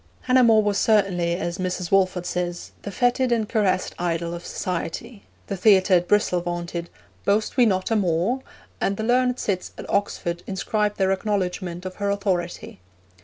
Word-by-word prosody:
Hannah 255 0 +4
More 220 -2 +5
was 205 -1 +1
certainly, 185 -6 +2
as 175 +1 -3
Mrs. 180 -1 -3
Walford 185 -2 +2
says, 175 -1 -3
'the - - -6
feted 245 +5 +1
and 225 -3 +1
caressed 195 -5 0
idol 170 -1 -1
of 170 0 -7
society.' 195 +5 -4 0.2
The 200 - -4
theatre 190 0 +4
at 175 -1 +4
Bristol 205 -4 +2
vaunted, 175 0 -4 0.3
'Boast 210 +2 +1
we 250 -3 +5
not 185 +1 0
a - - +3
More?' 190 +6 +1 0.4
and 195 - 0
the 220 - -3
learned 250 +2 +2
cits 190 -6 -2
at - - -8
Oxford 175 -3 -1
inscribed 210 +2 -1
their 190 -1 +2
acknowledgment 185 -3 -2
of 185 - -6
her 200 0 -1
authority. 185 - -2
190 Hz, 170 wpm, -24 LUFS, 175-210 Hz, 0.4 s, More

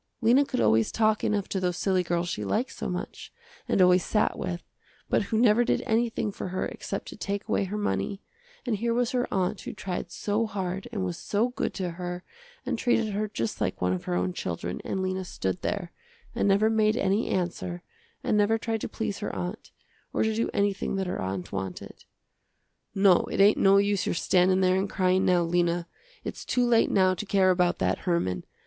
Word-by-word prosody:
Lena 245 +4 +5
could - - -3
always 110 0 +3
talk 215 -1 +2
enough 205 -2 0
to 195 - -1
those 180 -1 -1
silly 190 -1 +2
girls 175 0 -1
she 105 -11 -3
liked 220 - -1
so - - -5
much, - - -6 0.4
and 190 - +4
always 180 0 +5
sat 210 - +1
with, 175 -1 -4 0.5
but - - +3
who 220 - -1
never 235 0 +5
did 240 - 0
anything 225 -1 0
for - - -6
her 185 +1 -2
except - - -5
to - - -9
take 200 0 -4
away 195 - +1
her 205 +3 -4
money, 100 - -2 0.4
and 235 -4 0
here 230 +2 0
was 245 0 +1
her 250 -1 -1
aunt 190 +1 0
who - - -6
tried 180 -2 -4
so 215 +2 -1
hard 195 +1 -4
and 200 -5 -2
was 175 -2 -4
so 215 +4 0
good 245 - -2
to 185 -3 -2
her 180 +1 -5 0.4
and 250 -2 -2
treated 230 -4 +1
her 210 +2 -1
just 115 - -4
like - - -1
one 90 0 +1
of 90 - -4
her 90 - -1
own 90 0 0
children 85 +1 -4
and 190 - -2
Lena 185 0 -2
stood 95 - -3
there, 185 -5 -3 0.4
and - - +1
never 200 +2 +4
made 220 0 +2
any 195 +4 +1
answer 175 -1 -2 0.4
and - - +1
never 210 +2 +3
tried 225 -1 -3
to - - -3
please 215 -3 -3
her 210 - -3
aunt, 180 +5 -5 0.4
or - - +1
to 220 0 +1
do 230 +2 0
anything 200 -1 0
that 190 0 -1
her 180 - -3
aunt 95 0 -4
wanted. 95 -2 -6 0.9
"No, 195 -2 +5
it - - -2
ain't 205 +2 +6
no 195 0 +6
use 200 -1 +2
your - - 0
standin' 185 +2 +3
there 185 0 +3
and 195 +1 -1
cryin', 185 0 +2
now, 180 -1 +4
Lena. 170 0 +1 0.4
Its - - -6
too 250 -1 +1
late 235 -1 +4
now 185 -1 +4
to 185 - -4
care 190 -2 +4
about 180 -1 +2
that - - 0
Herman. 130 - -1
190 Hz, 210 wpm, -27 LUFS, 175-215 Hz, 0.9 s, ain't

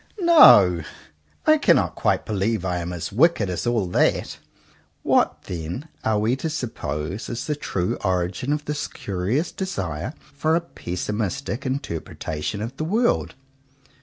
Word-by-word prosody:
No! 100 - +7 0.6
I 310 0 +5
cannot - - +3
quite - - 0
believe 105 -1 -1
I 90 -1 -1
am 85 +1 -4
as 90 +2 -5
wicked 115 - +3
as 90 +5 -3
all 115 -5 +1
that. - - +1 0.6
What, - - +2
then, 90 - -6
are 110 -1 +1
we 110 +4 +1
to 160 - -3
suppose 100 - -4
is 115 - -4
the 150 - -1
true 95 -10 -2
origin 90 +6 -1
of 150 0 -1
this 150 0 -2
curious 100 - -2
desire 95 - -4 0.2
for 155 +3 +1
a 170 - +2
pessimistic 110 - -4
interpretation 90 - -4
of 125 +4 -6
the 155 - -2
world? 225 +9 +1
110 Hz, 140 wpm, -23 LUFS, 90-145 Hz, 0.6 s, No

